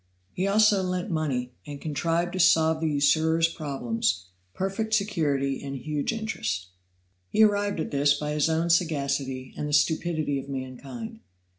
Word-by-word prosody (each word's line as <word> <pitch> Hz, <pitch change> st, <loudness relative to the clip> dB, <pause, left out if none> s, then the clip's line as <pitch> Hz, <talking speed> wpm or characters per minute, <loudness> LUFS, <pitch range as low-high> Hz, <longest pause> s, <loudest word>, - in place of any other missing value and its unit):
He 185 Hz, +2 st, -1 dB
also 210 Hz, 0 st, +4 dB
lent 180 Hz, +1 st, -2 dB
money, 135 Hz, -6 st, -1 dB, 0.2 s
and 145 Hz, -1 st, -7 dB
contrived 165 Hz, +4 st, -1 dB
to 185 Hz, -, -3 dB
solve 160 Hz, -2 st, +4 dB
the 160 Hz, -, +1 dB
usurers' 160 Hz, +3 st, +3 dB
problem 135 Hz, -8 st, -4 dB, 0.5 s
perfect 215 Hz, +4 st, -1 dB
security 150 Hz, -10 st, 0 dB
and 140 Hz, -1 st, -5 dB
huge 145 Hz, -, -2 dB
interest. 110 Hz, -, -3 dB, 0.6 s
He 220 Hz, -, +4 dB
arrived 205 Hz, -2 st, +2 dB
at -, -, -3 dB
this 145 Hz, 0 st, +3 dB
by 150 Hz, +1 st, -3 dB
his 150 Hz, +1 st, +1 dB
own 165 Hz, +1 st, +1 dB
sagacity 140 Hz, -6 st, 0 dB
and 150 Hz, -, -3 dB
the -, -, -4 dB
stupidity 155 Hz, -2 st, +1 dB
of 135 Hz, -, -9 dB
mankind. 140 Hz, -, -6 dB
155 Hz, 150 wpm, -26 LUFS, 140-185 Hz, 0.6 s, also